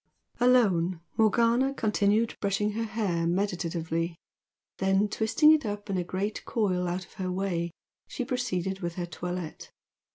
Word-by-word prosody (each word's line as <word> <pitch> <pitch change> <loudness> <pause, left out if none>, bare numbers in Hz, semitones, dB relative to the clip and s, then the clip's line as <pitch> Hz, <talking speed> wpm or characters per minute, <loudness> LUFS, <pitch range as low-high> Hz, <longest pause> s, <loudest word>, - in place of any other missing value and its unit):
Alone, 195 -9 +3 0.2
Morgana 235 +5 +3
continued 215 0 +2
brushing 200 +1 +1
her 225 +2 -2
hair 190 -7 -1
meditatively, 170 -3 -1 0.6
then, 195 +2 +3
twisting 220 +9 +4
it 310 -1 +4
up 205 -1 -4
in 190 - 0
a - - 0
great 190 +4 -3
coil 185 -5 0
out 180 +1 -3
of - - -21
her 185 -1 -1
way, 180 -2 -1 0.4
she 250 - -4
proceeded 190 -7 -2
with 170 -2 -4
her 175 - -2
toilette. 175 -1 -6
195 Hz, 140 wpm, -28 LUFS, 175-220 Hz, 0.6 s, twisting